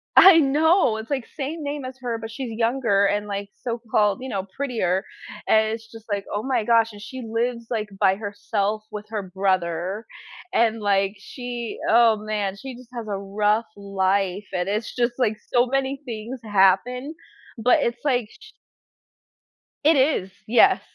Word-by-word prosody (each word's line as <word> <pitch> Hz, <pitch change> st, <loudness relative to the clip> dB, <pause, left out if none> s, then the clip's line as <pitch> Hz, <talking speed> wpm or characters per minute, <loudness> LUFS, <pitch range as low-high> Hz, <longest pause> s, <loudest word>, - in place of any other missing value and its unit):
I 375 Hz, -3 st, +10 dB
know, 300 Hz, -, +3 dB
it's 220 Hz, +4 st, -7 dB
like, 265 Hz, -5 st, -1 dB
same 305 Hz, +2 st, -4 dB
name 285 Hz, -2 st, -4 dB
as 260 Hz, 0 st, -7 dB
her, 235 Hz, -2 st, -2 dB
but 225 Hz, 0 st, -6 dB
she's 235 Hz, +1 st, -5 dB
younger 230 Hz, -4 st, +2 dB
and, 205 Hz, +1 st, 0 dB
like, 200 Hz, 0 st, -4 dB
so 235 Hz, -1 st, -3 dB
called, 210 Hz, -1 st, +2 dB
you 260 Hz, -, -5 dB
know, 195 Hz, -3 st, -2 dB
prettier 215 Hz, -9 st, 0 dB, 0.4 s
and 220 Hz, 0 st, +4 dB
it's 225 Hz, 0 st, -8 dB
just 225 Hz, -1 st, -12 dB
like, 200 Hz, -1 st, -1 dB
"Oh 205 Hz, +2 st, -2 dB
my 255 Hz, -4 st, 0 dB
gosh," 230 Hz, 0 st, +3 dB
and 205 Hz, -1 st, -12 dB
she 260 Hz, +3 st, -7 dB
lives, 235 Hz, +1 st, -2 dB
like, 215 Hz, -2 st, -2 dB
by 190 Hz, -2 st, +4 dB
herself 205 Hz, 0 st, -2 dB
with 210 Hz, 0 st, -6 dB
her 210 Hz, -3 st, -3 dB
brother 185 Hz, +1 st, -1 dB, 0.5 s
and, 225 Hz, -1 st, +2 dB
like, 195 Hz, 0 st, +2 dB
she 240 Hz, +2 st, -6 dB
oh 230 Hz, -1 st, +6 dB
man, 210 Hz, -2 st, -2 dB
she 260 Hz, +3 st, -8 dB
just 250 Hz, -1 st, -14 dB
has 235 Hz, -2 st, -6 dB
a 200 Hz, -1 st, -2 dB
rough 210 Hz, +3 st, +1 dB
life 195 Hz, 0 st, 0 dB
and 180 Hz, +1 st, -1 dB
it's 210 Hz, +2 st, -2 dB
just, 240 Hz, -1 st, +1 dB
like, 220 Hz, -4 st, +1 dB
so 245 Hz, 0 st, +4 dB
many 270 Hz, +1 st, -1 dB
things 235 Hz, +2 st, -6 dB
happen, 220 Hz, -, +2 dB, 0.4 s
but 240 Hz, +3 st, +4 dB
it's 235 Hz, 0 st, -2 dB
like, 245 Hz, -6 st, +1 dB
sh 435 Hz, 0 st, -16 dB, 1.3 s
It 315 Hz, +1 st, +6 dB
is, 260 Hz, -9 st, +2 dB, 0.2 s
yes, 240 Hz, -, +5 dB
225 Hz, 170 wpm, -23 LUFS, 200-250 Hz, 1.3 s, I